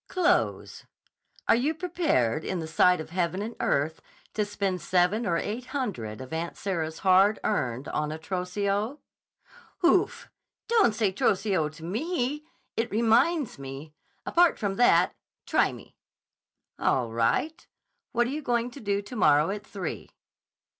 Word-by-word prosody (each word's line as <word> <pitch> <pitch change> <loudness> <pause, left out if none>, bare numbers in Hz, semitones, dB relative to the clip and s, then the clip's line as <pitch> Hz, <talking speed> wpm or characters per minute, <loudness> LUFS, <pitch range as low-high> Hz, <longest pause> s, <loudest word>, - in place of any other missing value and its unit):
"Clothes. 365 -2 0 0.6
Are - - +6
you 275 +7 +1
prepared, 320 - 0
in 190 - -2
the 160 - -4
sight 170 +2 +4
of 160 - -7
heaven 175 0 -1
and 225 +2 -6
earth, 150 +3 0 0.3
to 215 - +1
spend 200 -3 -2
seven 185 +7 +2
or 170 -1 +1
eight 225 +8 -3
hundred 130 - -4
of 130 +4 -9
Aunt 165 +1 -3
Sarah's 165 -5 -3
hard 195 +3 +5
earned 130 - -1
on 150 0 -2
a 155 - -4
trousseau?" 200 - -2 0.9
"Oof! 370 +4 +2 0.4
Don't 435 - +4
say 215 -3 +1
trousseau 190 -4 +1
to 155 +2 -14
me! 295 - -2 0.3
It 230 +1 -1
reminds 235 - +2
me. 135 +3 -8 0.3
Apart 345 0 +4
from 200 -3 -2
that—try 180 -7 +2
me!" - - -13 0.8
"All 120 -3 +1
right. 300 - 0 0.4
What 240 0 +2
are 245 - -3
you 300 +2 -3
going 240 -2 0
to 280 - -10
do 200 -3 -1
tomorrow 165 - +3
at 210 +1 -5
three?" 190 -5 -5
200 Hz, 140 wpm, -27 LUFS, 160-240 Hz, 0.9 s, Are